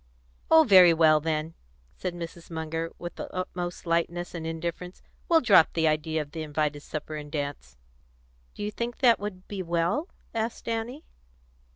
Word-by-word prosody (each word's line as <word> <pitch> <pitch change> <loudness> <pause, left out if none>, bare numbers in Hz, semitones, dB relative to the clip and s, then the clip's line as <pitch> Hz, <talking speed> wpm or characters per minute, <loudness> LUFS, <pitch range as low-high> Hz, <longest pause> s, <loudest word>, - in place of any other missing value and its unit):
"Oh, 320 0 +8
very 185 - +7
well, 155 -1 +5
then," 155 +1 -2 0.4
said 180 -2 -4
Mrs. 170 0 -8
Munger, 160 0 -3
with 175 -1 -7
the - - -6
utmost 180 -1 -4
lightness 170 +1 -1
and 165 -2 -5
indifference, 170 +2 -5 0.3
"we'll 330 -1 +5
drop 200 -9 +5
the 160 -1 +2
idea 155 0 0
of 145 - -19
the 160 - -5
invited 150 -1 -1
supper 155 +1 -6
and 150 -1 -8
dance." 145 - -5 0.8
"Do - - -6
you 210 - -2
think 235 +2 -4
that 240 -4 +5
would 195 -2 -6
be 200 -2 -4
well?" 175 - 0 0.2
asked 225 +1 -3
Annie. 230 +6 -3
170 Hz, 165 wpm, -27 LUFS, 160-200 Hz, 0.8 s, Oh